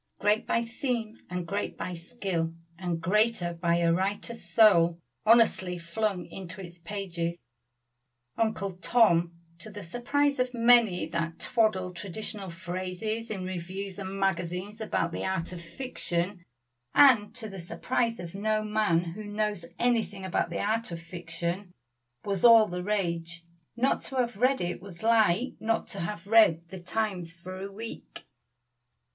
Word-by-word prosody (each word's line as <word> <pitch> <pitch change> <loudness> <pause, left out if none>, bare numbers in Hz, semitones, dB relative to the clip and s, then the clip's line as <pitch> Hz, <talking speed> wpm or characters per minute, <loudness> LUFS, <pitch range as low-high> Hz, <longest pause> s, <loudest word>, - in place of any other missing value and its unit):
Great 210 +1 +2
by 230 - +2
theme, 230 -2 -3
and 180 -1 -3
great 200 +4 -3
by 180 - -4
skill, 170 -2 -3 0.2
and 175 -3 -2
greater 210 -1 +2
by 170 0 +1
a 170 -1 +3
writer's 205 +6 -2
soul 175 -7 +5 0.3
honestly 215 -6 +4
flung 180 +2 -2
into 185 -1 -8
its 175 -2 -10
pages, 170 -2 -3 1.0
"Uncle 200 -4 -1
Tom," 170 -2 +4 0.3
to 215 - -7
the 205 -1 -8
surprise 275 +9 0
of 250 0 0
many 230 -7 +5
that 165 0 -3
twaddle 215 -7 +1
traditional 195 +2 -4
phrases 185 +6 -4
in 195 -4 -3
reviews 185 +2 -5
and 195 0 -5
magazines 190 +2 -1
about 170 -5 0
the - - -4
art 190 -3 -1
of 175 -2 -7
fiction, 175 -2 -3 0.5
and 225 -7 +6
to 230 -3 -5
the 195 -2 -8
surprise 230 +6 -1
of 170 -1 -7
no 215 +2 0
man 210 -6 +2
who 175 +5 -6
knows 205 -3 -2
anything 225 -5 0
about 175 -2 0
the 170 - -3
art 220 0 -1
of 170 - -4
fiction, 170 +2 -4 0.5
was 195 -3 -2
all 230 -2 +9
the 180 -3 -4
rage. 170 -4 -2 0.3
Not 250 +3 +2
to 270 - -5
have 245 -4 0
read 255 +4 +3
it 175 +1 -3
was 190 0 -11
like 225 +1 +3
not 225 0 0
to 200 - -5
have 190 +1 -4
read 185 -6 +5
the 190 0 -7
Times 180 -2 -1
for 185 +2 -8
a 200 +1 -5
week. 225 +3 -9
195 Hz, 150 wpm, -28 LUFS, 170-220 Hz, 1.0 s, all